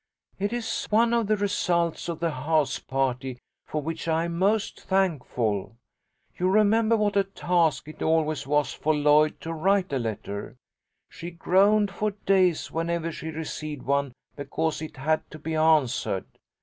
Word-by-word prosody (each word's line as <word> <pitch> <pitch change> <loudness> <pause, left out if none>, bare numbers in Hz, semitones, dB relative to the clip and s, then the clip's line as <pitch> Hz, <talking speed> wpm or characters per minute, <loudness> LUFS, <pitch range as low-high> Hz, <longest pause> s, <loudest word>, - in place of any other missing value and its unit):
"It 205 +2 -1
is 240 -1 -2
one 230 +2 +3
of 230 -3 +1
the 215 0 +2
results 175 -5 0
of 170 - -4
the 170 0 0
house 150 +2 0
party 130 -1 -2 0.3
for 155 -1 -3
which 165 +2 -4
I 165 +1 +1
am 170 0 -4
most 205 +4 0
thankful. 125 - -1 0.6
You 180 +1 +2
remember 220 +3 +4
what 210 -1 0
a 200 - +4
task 175 -6 0
it 155 - -11
always 155 -3 +1
was 145 0 +1
for 155 0 0
Lloyd 150 +1 +3
to 165 - -4
write 190 +1 +1
a 135 - +1
letter. 110 0 -5 0.5
She 170 - -7
groaned 195 +4 +3
for 210 +2 -1 0.2
days 185 -4 +2
whenever 165 0 -2
she 160 - -7
received 155 -2 -5
one, 140 -1 0 0.2
because 150 +3 -2
it 155 -2 -7
had 155 +4 0
to 155 - -10
be 160 +2 -5
answered. 155 -11 +2
160 Hz, 160 wpm, -26 LUFS, 150-195 Hz, 0.6 s, remember